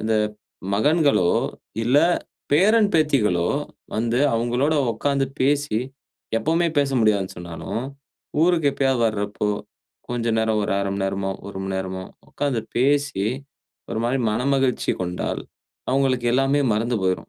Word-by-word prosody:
அந்த 110 Hz, +1 st, 0 dB, 0.6 s
மகன்களோ 145 Hz, -, +3 dB, 0.5 s
இல்ல 125 Hz, +4 st, +3 dB, 0.6 s
பேரன், 210 Hz, +7 st, +5 dB
பேத்திகளோ 110 Hz, -, +2 dB, 0.5 s
வந்து 115 Hz, +2 st, +1 dB, 0.2 s
அவங்களோட 120 Hz, +6 st, +1 dB, 0.2 s
உட்கார்ந்து 140 Hz, +4 st, 0 dB
பேசி 140 Hz, -4 st, +2 dB, 0.6 s
எப்பவுமே 165 Hz, +7 st, +1 dB
பேச 140 Hz, -1 st, +2 dB
முடியாதுன்னு 105 Hz, -4 st, +2 dB
சொன்னாலும், 90 Hz, +6 st, -5 dB, 0.6 s
ஊருக்கு 165 Hz, -4 st, +3 dB
எப்பயாவது 135 Hz, -3 st, +1 dB
வரப்போ, 105 Hz, -1 st, -2 dB, 0.6 s
கொஞ்ச 120 Hz, -1 st, -2 dB
நேரம் 110 Hz, -1 st, +1 dB
ஒரு -, -, -1 dB
அரைமணி 100 Hz, 0 st, -2 dB
நேரமோ, 95 Hz, 0 st, -1 dB, 0.2 s
ஒருமணி 95 Hz, -1 st, -5 dB
நேரமோ 95 Hz, 0 st, -4 dB, 0.3 s
உட்கார்ந்து 135 Hz, -6 st, -1 dB, 0.2 s
பேசி, 140 Hz, -4 st, +2 dB, 0.7 s
ஒரு -, -, -2 dB
மாரி 130 Hz, +3 st, +1 dB
மனமகிழ்ச்சி 135 Hz, +2 st, +1 dB
கொண்டால், 90 Hz, -1 st, -3 dB, 0.5 s
அவங்களுக்கு 130 Hz, -2 st, +1 dB
எல்லாமே 135 Hz, +2 st, +2 dB
மறந்து 115 Hz, +1 st, 0 dB
போயிரும். 95 Hz, 0 st, -1 dB
120 Hz, 115 wpm, -23 LUFS, 105-140 Hz, 0.7 s, பேரன்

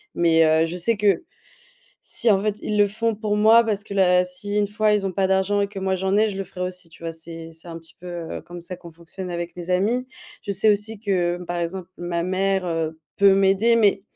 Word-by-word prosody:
Mais 165 Hz, -1 st, +4 dB
heu, 160 Hz, +1 st, +4 dB
je 175 Hz, +2 st, -5 dB
sais 210 Hz, +5 st, +1 dB
que, 205 Hz, -, +2 dB, 0.8 s
si 235 Hz, -1 st, 0 dB
en 195 Hz, -1 st, +3 dB
fait 210 Hz, -1 st, -1 dB
ils 210 Hz, 0 st, -1 dB
le 205 Hz, -, +6 dB
font 220 Hz, +2 st, -1 dB
pour 210 Hz, -1 st, -2 dB
moi 220 Hz, +2 st, +6 dB
parce 210 Hz, -2 st, -2 dB
que 200 Hz, -, -9 dB
là 180 Hz, -2 st, +4 dB
si 190 Hz, +3 st, -5 dB
1 205 Hz, -1 st, +2 dB
fois 215 Hz, 0 st, +1 dB
ils 200 Hz, -2 st, 0 dB
ont 190 Hz, -, -2 dB
pas 190 Hz, +1 st, +1 dB
d'argent 190 Hz, +2 st, +1 dB
et 200 Hz, -, 0 dB
que 200 Hz, -, -8 dB
moi 190 Hz, 0 st, 0 dB
j'en 190 Hz, +2 st, 0 dB
ai, 215 Hz, +1 st, +4 dB
je 195 Hz, -, -6 dB
le 195 Hz, -, -2 dB
ferai 180 Hz, 0 st, -7 dB
aussi, 180 Hz, -1 st, -5 dB
tu 165 Hz, -, -17 dB
vois? 165 Hz, 0 st, -4 dB
C'est 165 Hz, 0 st, -9 dB
c'est 165 Hz, +2 st, -12 dB
un 165 Hz, 0 st, -7 dB
petit 165 Hz, -, -16 dB
peu, 180 Hz, -, -11 dB
heu, 170 Hz, -2 st, -5 dB
comme 175 Hz, 0 st, -10 dB
ça 180 Hz, +1 st, -7 dB
qu'on 170 Hz, -1 st, -12 dB
fonctionne 175 Hz, +3 st, -8 dB
avec 170 Hz, 0 st, -4 dB
mes 175 Hz, +1 st, -6 dB
amis. 225 Hz, +8 st, +1 dB, 0.4 s
Je 200 Hz, -, -5 dB
sais 205 Hz, +3 st, +3 dB
aussi 210 Hz, +1 st, -1 dB
que 180 Hz, -5 st, 0 dB
par 175 Hz, 0 st, -3 dB
exemple 175 Hz, +1 st, -4 dB
ma 175 Hz, -1 st, -2 dB
mère, 190 Hz, +1 st, 0 dB
heu, 160 Hz, -1 st, -2 dB, 0.2 s
peut 200 Hz, -1 st, +6 dB
m'aider 195 Hz, +4 st, +3 dB
mais, 200 Hz, -3 st, +3 dB
190 Hz, 250 wpm, -23 LUFS, 175-205 Hz, 0.8 s, le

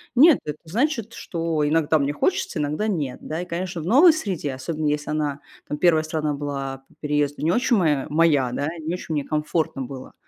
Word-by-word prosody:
Нет, 300 Hz, +3 st, +7 dB
это 150 Hz, 0 st, -4 dB
значит, 230 Hz, -, -1 dB
что 165 Hz, -3 st, -2 dB
иногда 155 Hz, 0 st, +2 dB
мне 140 Hz, +1 st, 0 dB
хочется, 180 Hz, +3 st, 0 dB
иногда 150 Hz, +9 st, -1 dB
нет. 150 Hz, -11 st, -2 dB
Да, 160 Hz, +2 st, -4 dB
и, -, -, -5 dB
конечно, 175 Hz, -1 st, -4 dB
в -, -, -7 dB
новой 290 Hz, -, +7 dB
среде, 185 Hz, -, -3 dB
особенно, 150 Hz, +3 st, -3 dB
если 150 Hz, 0 st, -1 dB
она, 145 Hz, -2 st, -2 dB, 0.3 s
там, 150 Hz, -, -3 dB
1 160 Hz, -1 st, +4 dB
страна 155 Hz, -1 st, -1 dB
была 135 Hz, -2 st, -4 dB
по -, -, -25 dB
переезду 145 Hz, -1 st, 0 dB
не 165 Hz, -, +3 dB
очень 240 Hz, +4 st, +2 dB
моя 150 Hz, -7 st, +1 dB
моя, 150 Hz, -5 st, +3 dB
да, 145 Hz, +3 st, -2 dB
не 160 Hz, +2 st, -3 dB
очень 175 Hz, -3 st, -6 dB
мне 145 Hz, -2 st, 0 dB
комфортно 155 Hz, -2 st, -1 dB
было, 130 Hz, 0 st, -9 dB
155 Hz, 200 wpm, -23 LUFS, 145-175 Hz, 0.3 s, Нет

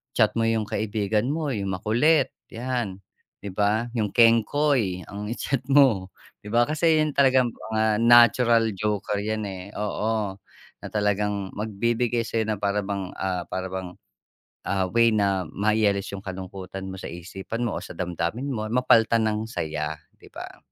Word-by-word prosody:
chat -, -, +4 dB
mo 115 Hz, -, +2 dB
yung 115 Hz, -1 st, +1 dB
kaibigan 105 Hz, +1 st, -1 dB
mo, 155 Hz, -2 st, -2 dB
yung 100 Hz, -6 st, -2 dB
makulit, 120 Hz, -, +2 dB, 0.2 s
'yan, 115 Hz, -5 st, -3 dB, 0.4 s
'di 100 Hz, -, -6 dB
ba? 105 Hz, +4 st, +1 dB
Yung 105 Hz, -2 st, 0 dB
kengkoy 115 Hz, -3 st, +3 dB
ang 105 Hz, +1 st, -6 dB
i-chat 125 Hz, +2 st, -2 dB
mo, 130 Hz, -10 st, +4 dB, 0.3 s
di 105 Hz, -, -10 dB
ba? 120 Hz, +2 st, +3 dB
Kasi, 155 Hz, +2 st, +2 dB
yun 150 Hz, -, -3 dB
talaga'ng 130 Hz, -3 st, +3 dB
mga 110 Hz, 0 st, 0 dB
natural 120 Hz, -1 st, +5 dB
joker 105 Hz, +1 st, -2 dB
yan, 110 Hz, 0 st, -2 dB
eh, 95 Hz, -1 st, -7 dB
oo. 105 Hz, 0 st, -1 dB, 0.5 s
Na -, -, -6 dB
talagang 105 Hz, -1 st, -1 dB
magbibigay 115 Hz, +3 st, -1 dB
sa'yo 110 Hz, -1 st, -1 dB
na 110 Hz, -, 0 dB
para 100 Hz, +1 st, 0 dB
bang, 100 Hz, -2 st, -4 dB
ah, 90 Hz, -2 st, -3 dB
para 95 Hz, 0 st, -4 dB
bang, 95 Hz, -1 st, -5 dB, 0.7 s
ah, 95 Hz, -1 st, 0 dB
way 115 Hz, 0 st, +4 dB
na 100 Hz, -3 st, +1 dB
mai-alis 105 Hz, -1 st, +1 dB
yung 95 Hz, -, -10 dB
kalungkutan 95 Hz, 0 st, -7 dB
mo 95 Hz, -, -7 dB
sa -, -, -8 dB
isipan 95 Hz, +6 st, -6 dB
mo 115 Hz, -, -2 dB
o -, -, -5 dB
sa -, -, -9 dB
damdamin 90 Hz, -, -3 dB
mo. 110 Hz, -5 st, -3 dB
Mapalitan 115 Hz, -2 st, +4 dB
ng 105 Hz, 0 st, 0 dB
saya, 75 Hz, -6 st, -3 dB, 0.2 s
'di -, -, -17 dB
ba? -, -, -9 dB
105 Hz, 160 wpm, -25 LUFS, 95-115 Hz, 0.7 s, natural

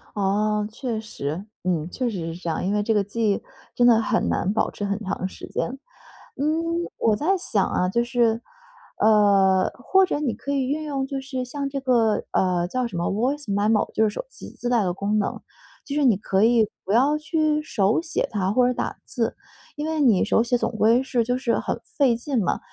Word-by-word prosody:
哦， 210 Hz, +1 st, +1 dB
确 235 Hz, -1 st, -3 dB
实。 175 Hz, -4 st, -5 dB, 0.2 s
嗯， 170 Hz, -3 st, -1 dB
确 250 Hz, +5 st, -2 dB
实 165 Hz, -5 st, -4 dB
是 -, -, -8 dB
这 175 Hz, -, -4 dB
样。 160 Hz, -, -2 dB
因 195 Hz, -, 0 dB
为 210 Hz, 0 st, +1 dB
这 225 Hz, -, +1 dB
个 205 Hz, -1 st, +2 dB
记 210 Hz, +1 st, 0 dB
忆 -, -, -1 dB, 0.3 s
真 245 Hz, 0 st, +4 dB
的 225 Hz, -2 st, +6 dB
很 230 Hz, -1 st, 0 dB
难 190 Hz, -, 0 dB
保 -, -, +1 dB
持 205 Hz, -, -5 dB
很 200 Hz, +1 st, -2 dB
长 185 Hz, -1 st, -2 dB
时 -, -, -10 dB
间。 -, -, -2 dB, 0.7 s
嗯， 270 Hz, -, -4 dB, 0.6 s
我 220 Hz, -2 st, +2 dB
在 355 Hz, -, +1 dB
想 210 Hz, -, 0 dB
啊， 180 Hz, -, 0 dB
就 235 Hz, +5 st, +1 dB
是， 240 Hz, -2 st, +1 dB, 0.6 s
呃， 200 Hz, -3 st, +4 dB
或 380 Hz, +10 st, +3 dB
者 290 Hz, -, -1 dB
你 255 Hz, -7 st, -1 dB
可 280 Hz, +5 st, -5 dB
以 270 Hz, -2 st, 0 dB
运 300 Hz, +4 st, -2 dB
用， 275 Hz, -3 st, -2 dB
就 270 Hz, 0 st, -4 dB
是 265 Hz, -1 st, -4 dB
像 275 Hz, +2 st, -4 dB
这 275 Hz, 0 st, -4 dB
个 235 Hz, -5 st, +2 dB
呃， 180 Hz, -2 st, +1 dB
叫 255 Hz, +4 st, -1 dB
什 205 Hz, -7 st, -6 dB
么， 170 Hz, -, -1 dB
voice 260 Hz, +8 st, -1 dB
memo， 205 Hz, +2 st, +1 dB
就 220 Hz, -, +2 dB
是 -, -, -2 dB
手 -, -, -4 dB
机 -, -, -11 dB
自 245 Hz, -, -5 dB
带 240 Hz, -3 st, +3 dB
的 180 Hz, -2 st, 0 dB
功 200 Hz, +3 st, -1 dB
能。 200 Hz, -, -2 dB, 0.4 s
就 280 Hz, -, -5 dB
是 295 Hz, -1 st, +2 dB
你 235 Hz, -6 st, +5 dB
可 195 Hz, 0 st, 0 dB
以 225 Hz, -1 st, +4 dB, 0.2 s
不 190 Hz, -, -7 dB
要 270 Hz, +7 st, +4 dB
去 305 Hz, -1 st, 0 dB
手 205 Hz, -5 st, +1 dB
写 325 Hz, -, -2 dB
它 190 Hz, -3 st, 0 dB
或 250 Hz, +2 st, +4 dB
者 250 Hz, -, +1 dB
打 -, -, -3 dB
字， -, -, -2 dB, 0.4 s
因 295 Hz, +1 st, -3 dB
为 320 Hz, -1 st, -1 dB
你 235 Hz, -10 st, +4 dB
手 225 Hz, -, +3 dB
写 240 Hz, +1 st, +1 dB
总 -, -, -1 dB
归 225 Hz, +2 st, +4 dB
是 255 Hz, -2 st, 0 dB, 0.4 s
很 -, -, -3 dB
费 265 Hz, -5 st, +1 dB
劲 245 Hz, -1 st, -1 dB
嘛， 180 Hz, -, 0 dB
225 Hz, 250 characters per minute, -24 LUFS, 200-265 Hz, 0.7 s, 的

